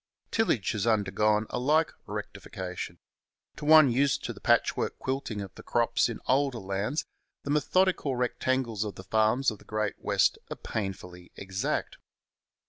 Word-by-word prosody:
Tillage 180 - +1
has 105 0 -2
undergone 105 0 +2
a - - -1
like 155 +5 +3 0.2
rectification. 90 -2 -6 0.6
To 150 - -7
one 155 -3 +8
used 135 +3 +2
to - - -3
the - - -14
patchwork - - +2
quilting 130 -5 -3
of 95 -1 -8
the - - -11
crops 115 -2 +1
in 115 - -5
older 135 -1 +2
lands 100 +9 -2 0.4
the 140 - -3
methodical 150 -1 +2
rectangles 125 -2 0
of 105 -2 -5
the 95 - -9
farms 110 +6 +2
of 105 - -9
the - - -17
Great 110 -1 -2
West - - +2
are - - -4
painfully 90 -4 -6
exact. 95 0 -3
115 Hz, 150 wpm, -28 LUFS, 100-135 Hz, 0.6 s, one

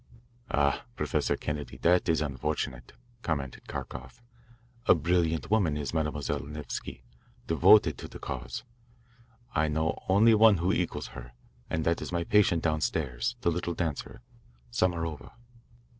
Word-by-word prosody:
"Ah, 70 -1 +1
Professor - - 0
Kennedy, 75 -1 -4
that 90 +1 +3
is 80 -1 +3
unfortunate," 70 -3 -3 0.3
commented 70 - -3
Kharkoff. 65 0 -7 0.7
"A - - +8
brilliant 80 0 0
woman 90 -9 +2
is 75 0 -3
Mademoiselle 75 -3 -1
Nevsky 75 -4 -6 0.4
devoted 100 -8 +5
to - - -7
the - - -10
cause. - - -5 0.9
I 80 - +2
know 80 0 0
only 110 +4 +6
one 110 -2 +6
who 90 +3 +1
equals - - -2
her, - - -10 0.4
and 80 -1 -1
that 85 0 +1
is - - -5
my 85 -1 0
patient 95 -3 +3
downstairs, 75 -5 -1
the 85 - +2
little 85 0 -2
dancer, 80 -5 -4 0.5
Samarova." 80 -2 -1
80 Hz, 130 wpm, -29 LUFS, 70-85 Hz, 0.9 s, A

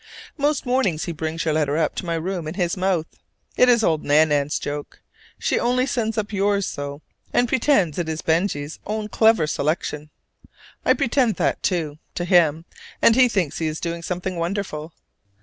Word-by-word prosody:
Most 290 -1 0
mornings 245 -11 +1
he 175 - -3
brings 160 +1 -3
your 155 - +1
letter 150 -1 +1
up 160 -2 +1
to 180 - -5
my 170 - 0
room 170 0 -3
in 155 - -5
his 175 -3 0
mouth. 185 -3 0 0.5
It 250 - +5
is 235 -2 +4
old 160 -5 +1
Nan 155 +2 +4
nan's 145 0 +1
joke: 145 0 -6 0.4
she - - 0
only 250 +2 +2
sends 230 -4 -2
up 215 0 -2
yours 200 0 +1
so, 145 +1 -6 0.3
and 245 - +2
pretends 225 - +2
it 165 -2 -2
is 160 0 -4
Benjy's 160 -3 -1
own 215 0 -3
clever 220 -8 +4
selection. 150 0 -2 0.7
I - - +4
pretend 260 -4 +1
that, - - 0
too, 155 -5 -1 0.2
to 175 - -2
him; 165 -3 +3 0.3
and 225 - +5
he 255 0 +6
thinks 190 -9 -1
he 160 - 0
is 155 0 -3
doing 170 -1 -4
something 180 +1 -4
wonderful. 170 -3 -3
175 Hz, 185 wpm, -22 LUFS, 155-215 Hz, 0.7 s, he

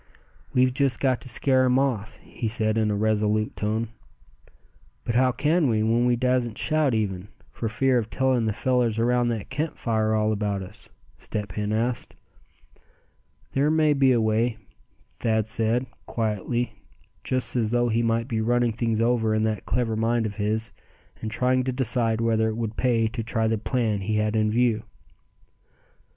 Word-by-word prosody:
"We've 130 0 +3
just 135 -2 +1
got 130 -3 +1
to 130 - -7
scare 130 +2 +3
him 125 0 +3
off," 125 -7 -1
he 115 - -5
said, 110 -1 +1
in 110 -1 +1
a 105 - 0
resolute 105 0 0
tone. 110 +2 -2 1.1
"But 115 - -2
how 130 +2 +3
can 150 +4 +1
we, 110 -2 +1
when 115 +2 +2
we 120 - +3
dassn't 125 -2 0
shout 150 -5 +1
even, 100 -3 -2 0.2
for 115 - -3
fear 125 +2 +2
of 110 -1 -5
telling 130 -3 +1
the - - +1
fellers 120 0 0
around 120 +1 +2
that 115 -2 -3
camp 150 +4 -3
fire 110 -2 0
all 110 0 +1
about 100 -2 -1
us?" 105 +4 -12 0.3
Step 105 -3 -5
Hen 105 +2 -3
asked. 115 +3 -1 1.4
"There 140 +2 +2
may 155 -1 +3
be 135 -2 +4
a 120 - +3
way," 110 +1 +1 0.6
Thad 110 -2 +1
said, 115 +2 +1 0.2
quietly, 110 0 -2 0.4
just 130 0 -1
as 115 -3 +1
though 120 +1 +1
he 115 +1 +1
might 115 0 0
be 110 -3 -1
running 120 +1 +2
things 115 0 -1
over 115 -2 +2
in 110 - +1
that 110 -2 -2
clever 115 0 0
mind 115 +1 +1
of 105 0 -5
his, 110 +2 -1 0.5
and 110 - -3
trying 130 +3 +1
to 130 - 0
decide 120 -3 0
whether 110 -1 +2
it 110 - -4
would 115 -2 -3
pay 120 -2 +2
to 115 0 -4
try 115 0 -1
the 110 -1 0
plan 110 -3 -1
he 105 +3 -1
had 105 +1 0
in 110 -1 +2
view. 115 -1 +2
115 Hz, 175 wpm, -25 LUFS, 110-125 Hz, 1.4 s, be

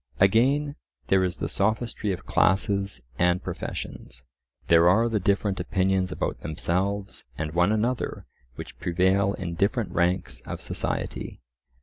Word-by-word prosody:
Again, 135 +9 +3 0.3
there 95 -1 +4
is 90 -1 -1
the - - -2
sophistry 110 +1 -1
of 90 - -5
classes 100 - +1 0.2
and 90 +1 +2
professions. 60 +1 -6 0.4
There 85 +1 +6
are 110 +6 +4
the 110 -2 0
different 100 0 +1
opinions 95 -1 +1
about - - -2
themselves 95 +5 -2
and 75 0 -3
one 90 +4 +3
another 115 +4 -1 0.3
which - - -9
prevail 95 +3 +2
in 90 -2 -4
different 100 +5 0
ranks 90 +2 0
of - - -6
society. - - -4
95 Hz, 130 wpm, -26 LUFS, 90-105 Hz, 0.4 s, There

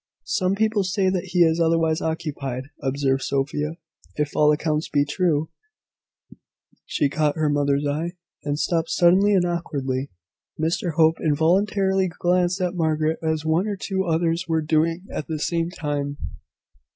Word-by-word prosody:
"Some 185 -2 0
people 215 -1 +1
say 190 0 +1
that 185 -1 -2
he 175 -1 +3
is 160 0 +2
otherwise 165 -1 +2
occupied," 140 -4 -4
observed 135 -1 0
Sophia, 150 +4 -2 0.4
"If 150 -1 -2
all 150 0 +5
accounts 150 +1 -1
be 145 0 +2
true 155 -1 0 0.7
" - - -26
She 145 - +1
caught 150 +1 0
her 155 -2 +1
mother's 145 0 +1
eye, 155 +4 -2 0.3
and 145 0 -1
stopped 165 +1 0
suddenly 190 +4 +4
and 180 -2 +3
awkwardly. 140 -6 -2 0.5
Mr 165 +1 -1
Hope 160 +1 +3
involuntarily 190 +5 +2
glanced 180 +1 0
at 180 -1 0
Margaret, 160 -2 0
as 160 -1 -1
one 165 +6 +1
or 205 - -2
two 190 -1 -2
others 165 +1 0
were 160 -1 0
doing 165 +3 +1
at 150 - -4
the 160 - -3
same 165 +2 -1
time. 145 -4 -3
160 Hz, 150 wpm, -23 LUFS, 150-175 Hz, 0.7 s, all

